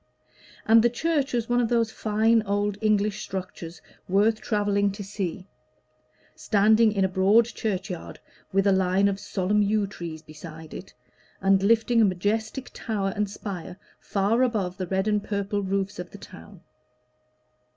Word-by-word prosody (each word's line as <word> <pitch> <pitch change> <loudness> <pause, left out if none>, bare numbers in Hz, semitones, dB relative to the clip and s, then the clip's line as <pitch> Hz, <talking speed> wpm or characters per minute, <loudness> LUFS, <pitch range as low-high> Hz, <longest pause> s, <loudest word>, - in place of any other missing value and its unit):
And 225 +1 +6
the 240 - +5
church 290 +3 -1
was 235 -2 -1
one 245 0 +2
of 230 - 0
those 230 -2 +1
fine 220 +2 +2
old 205 0 -1
English 215 -1 +1
structures 180 -3 -7 0.3
worth 210 +4 +2
travelling 205 -2 +1
to 205 +1 -7
see, 190 -2 -5 0.9
standing 215 +2 +3
in 195 -2 +1
a - - +2
broad 195 +5 +4
churchyard 195 -6 -4 0.3
with 195 +1 +2
a 200 - +5
line 190 +1 +3
of 200 0 -1
solemn 200 +1 0
yew 205 0 +2
trees 170 -5 -8
beside 155 0 -11
it, 190 - -10 0.4
and 195 0 +3
lifting 225 +3 +3
a - - +6
majestic 220 +7 -2
tower 200 -4 -2
and 210 -1 -1
spire 190 -3 -7 0.2
far 205 +4 0
above 205 -8 0
the 185 -2 -4
red 190 +3 0
and 210 -1 +1
purple 205 0 -2
roofs 195 -1 -2
of 180 - -6
the - - -11
town. 190 -1 -13
200 Hz, 155 wpm, -25 LUFS, 190-220 Hz, 0.9 s, And